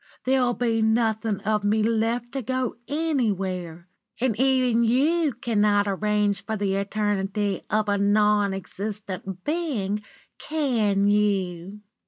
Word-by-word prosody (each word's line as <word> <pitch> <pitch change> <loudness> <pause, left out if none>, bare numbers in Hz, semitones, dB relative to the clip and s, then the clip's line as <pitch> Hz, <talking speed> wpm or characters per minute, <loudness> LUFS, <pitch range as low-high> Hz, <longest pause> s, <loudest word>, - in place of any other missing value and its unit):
There'll 255 -2 +2
be 230 -2 0
nothing 220 -1 +1
of 215 0 0
me 210 +1 +2
left 230 +2 0
to 270 - -3
go 255 +1 -2
anywhere; 195 - -2 0.3
and 245 -3 +1
even 255 -3 +3
you 295 +7 +2
cannot 210 -4 +1
arrange 205 0 0
for 220 - -3
the 200 -2 -1
eternity 200 0 -1
of 215 0 +1
a 200 -1 +1
non 205 0 +3
existent 195 -1 -5
being, 260 - -1 0.4
can 230 -10 +1
you? 200 -2 0
210 Hz, 120 wpm, -25 LUFS, 200-240 Hz, 0.4 s, even